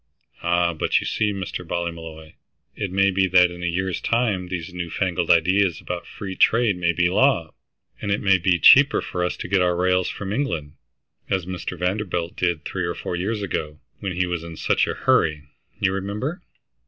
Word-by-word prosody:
"Ah 85 0 +1
but 80 - +1
you - - -6
see, 105 -1 0
Mr. 95 -2 -5
Ballymolloy, 80 -2 -5 0.4
it 100 - -3
may 100 +1 +3
be 95 0 +2
that 90 -1 +5
in 90 0 -9
a 90 - -1
year's 95 +1 -2
time 110 -6 0
these 90 -1 -5
new 85 -1 -4
fangled 90 -2 -1
ideas 90 +1 +3
about 90 -1 -6
free 95 -2 -7
trade 115 -1 +3
may 85 -1 +1
be 85 +1 +2
law, 90 - +2 0.5
and 100 - -3
it 100 - +1
may 95 -2 +3
be 90 +1 +2
much 85 - -5
cheaper 140 +1 +7
for 90 - -3
us 90 - -2
to - - -6
get 95 +1 +2
our 90 -1 +2
rails 90 +1 +1
from 100 0 -5
England, 85 - -2 0.6
as 95 -3 0
Mr. 90 0 -5
Vanderbilt 90 -1 -2
did 85 -4 -1
three 90 -2 -3
or 85 - -3
four - - -4
years 100 +4 -2
ago, 75 -5 -4 0.2
when 95 -2 -3
he 90 +1 0
was 90 -2 -3
in 85 -1 -8
such - - +1
a - - -2
hurry, 75 -2 +2 0.4
you 100 -3 +2
remember." 105 - -3
90 Hz, 200 wpm, -23 LUFS, 85-100 Hz, 0.6 s, cheaper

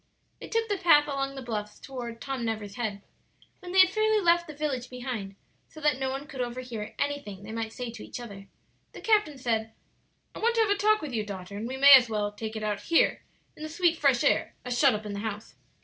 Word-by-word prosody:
They - - -8
took 455 0 0
the 405 -3 -1
path 295 -4 +6
along 275 -1 -2
the 270 - -7
bluffs 210 -3 -5
toward 240 -4 -7
"Tom 270 -3 -4
Never's 215 -3 -3
Head." 205 -3 -4 0.6
When 360 -2 -9
they 380 +1 +7
had 375 0 +5
fairly 435 +1 +2
left 345 -2 +3
the 305 - -9
village 270 -4 -3
behind, 245 -6 -5 0.3
so 310 - -12
that 295 -3 +1
no 265 -1 -1
one 270 +2 -4
could 275 -4 -6
overhear 240 -3 -5
anything 285 -9 -3
they 210 - -8
might 225 0 -3
say 245 0 -5
to - - -10
each - - -7
other, 200 -5 -9 0.5
the - - -10
captain 420 -10 +2
said, 225 -3 -1 0.6
"I - - -8
want 465 +1 +2
to 455 - +4
have 430 -2 +2
a - - +4
talk 430 -1 +2
with 285 -4 -5
you, 220 -2 0
daughter, 200 -1 -7
and 215 +3 -4
we 260 +2 -5
may 280 +1 +9
as 250 -3 +8
well 210 -1 -1
take 220 +1 -6
it 215 - -4
out 210 -1 -1
here 335 - +2 0.3
in - - -14
the 310 - -5
sweet 340 +1 +2
fresh 280 -6 +2
air, - - +1
as 250 -1 -2
shut 265 -2 +4
up 210 +1 -6
in 210 - -5
the 200 - -4
house." 210 0 -5
255 Hz, 240 wpm, -28 LUFS, 220-305 Hz, 0.6 s, may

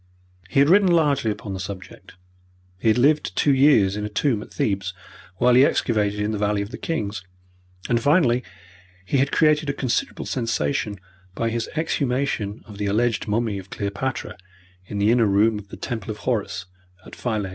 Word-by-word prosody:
He 135 - +2
had 140 - +6
written 190 +2 +5
largely 145 -8 +2
upon 105 -1 -4
the 95 - -5
subject, 95 0 -9 0.6
he 115 - -2
had 110 - +4
lived 145 +4 +2
two 145 - +3
years 130 -8 +4
in 105 - -3
a 105 - -3
tomb 110 +1 0
at - - -11
Thebes, 95 -3 -1 0.4
while 125 +4 +4
he 130 +2 +7
excavated 105 -6 +1
in 105 +1 0
the 105 - -3
Valley 105 0 +1
of 100 - -9
the - - -6
Kings, 105 -11 -3 0.6
and 120 -1 +1
finally 130 -4 +3 0.6
he 140 - 0
had 140 +1 +2
created 150 -1 +3
a - - 0
considerable 130 -3 -2
sensation 115 -3 -1 0.4
by 115 0 -1
his 115 0 -2
exhumation 130 -8 -1
of 105 -2 -12
the 105 - -1
alleged 115 +3 0
mummy 105 -1 0
of 95 0 -12
Cleopatra 105 +7 -4 0.5
in 105 - -5
the 100 +2 +3
inner 120 -2 +4
room 105 +2 +3
of 100 - -13
the - - -10
Temple 115 -2 -5
of 105 - -4
Horus, 105 -7 -1 0.4
at - - -11
Philae. 110 -5 -2
115 Hz, 185 wpm, -23 LUFS, 105-135 Hz, 0.6 s, he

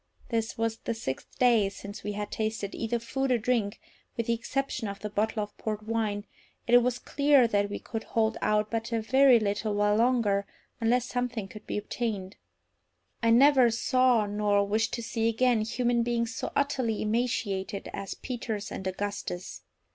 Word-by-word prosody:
This 225 -1 -1
was 225 0 -1
the 230 - -3
sixth 135 -12 -6
day 235 -5 +4
since 200 +1 -9
we 210 - -3
had 205 0 -4
tasted 215 -2 -2
either 235 +1 -1
food 260 +3 -2
or 245 - +4
drink, 225 -2 0 0.4
with 230 - -1
the 235 - +1
exception 240 0 -2
of 200 0 -6
the 210 - -4
bottle 215 +1 0
of 205 - -9
port 215 -1 -3
wine, 215 -2 -1 0.4
and 240 - +1
it 245 - +10
was 245 0 0
clear 280 -3 +3
that 205 -2 +1
we 205 - -3
could 225 -1 -6
hold 220 -1 +1
out 210 0 +1
but 230 +1 -2
a 230 - +1
very 260 +2 +5
little 205 0 -1
while 205 0 +3
longer 225 -4 +2 0.3
unless 240 +2 +2
something 245 -5 -2
could 215 +2 -12
be - - -2
obtained. 210 -3 -3 0.8
I 230 - +2
never 260 +1 +6
saw 250 0 +3
before, 205 0 -5
nor 205 -1 +3
wish 215 +3 +1
to 235 - -4
see 225 0 0
again, 240 0 +2
human 235 +2 +1
beings 235 0 -1
so - - -4
utterly 255 -6 0
emaciated 215 -4 -1
as 195 - -5
Peters 225 -4 -4
and 190 - -5
Augustus. 190 -1 -4
225 Hz, 180 wpm, -28 LUFS, 205-240 Hz, 0.8 s, it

